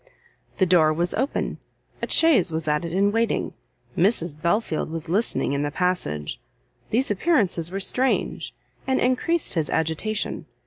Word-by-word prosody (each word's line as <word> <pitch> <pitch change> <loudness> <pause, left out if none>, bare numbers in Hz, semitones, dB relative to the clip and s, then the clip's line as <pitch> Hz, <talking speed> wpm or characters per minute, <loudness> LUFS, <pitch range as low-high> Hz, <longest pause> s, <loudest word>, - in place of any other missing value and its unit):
The 190 - +3
door 170 -3 +4
was 170 +3 0
open, 265 +5 -2 0.4
a - - -3
chaise 255 - +4
was 160 0 -2
at 150 +2 +1
it 170 - -4
in 200 +3 +2
waiting, 230 +1 0 0.4
Mrs 170 -5 +1
Belfield 170 -2 0
was 165 0 -6
listening 195 -6 0
in 140 - 0
the 145 - -1
passage; 145 - -2 0.5
these 245 +1 +1
appearances 195 - +1
were 195 +2 -4
strange, 250 +7 0 0.4
and 265 - +2
encreased 275 +7 +1
his 160 -5 0
agitation. 160 +7 -2
180 Hz, 145 wpm, -24 LUFS, 160-225 Hz, 0.5 s, door